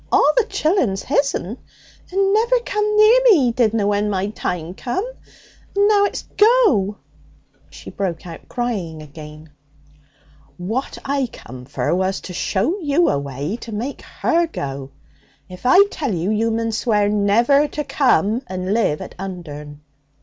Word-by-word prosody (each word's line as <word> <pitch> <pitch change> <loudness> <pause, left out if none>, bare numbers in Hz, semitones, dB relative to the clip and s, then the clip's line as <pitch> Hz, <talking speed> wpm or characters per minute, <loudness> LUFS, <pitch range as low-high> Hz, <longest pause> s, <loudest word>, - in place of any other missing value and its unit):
All - - +4
the - - +3
chillun's 285 - 0
his'n. 265 - -1 0.5
And 390 +1 +2
never 470 +3 +3
come 425 -2 -1
near 435 +4 +7
me, 460 -5 +8
he 240 - +2
didna, 225 -3 +1
when 205 +1 +1
my 195 0 -1
time 175 -5 -4
come. 255 - -3 0.7
And 405 +1 +4
now 410 -1 +4
it's - - -3
"go!"' 415 - +4 0.7
She - - -11
broke 180 -5 -3
out 165 -2 -10
crying 190 -11 -3
again. 150 +1 -12 1.1
'What 220 +9 -3
I 275 -1 0
come 125 +1 -11
for - - -2
was 190 +1 0
to 180 - -8
show 215 - -1
you 315 +1 +2
a 140 - +1
way 140 - -4
to 235 - -9
make 235 +7 -4
her 340 0 0
go. 135 - -5 0.6
If 185 +6 -6
I 380 +10 +7
tell 270 -10 -2
you, 175 +5 -1
you 220 +2 +1
mun 225 0 -1
swear 210 -2 +1
never 225 +8 +3
to 300 +1 -4
come 255 -5 +2
and 185 +1 -3
live 215 -9 +1
at - - -8
Undern.' 150 -6 -8
215 Hz, 155 wpm, -20 LUFS, 180-295 Hz, 1.1 s, me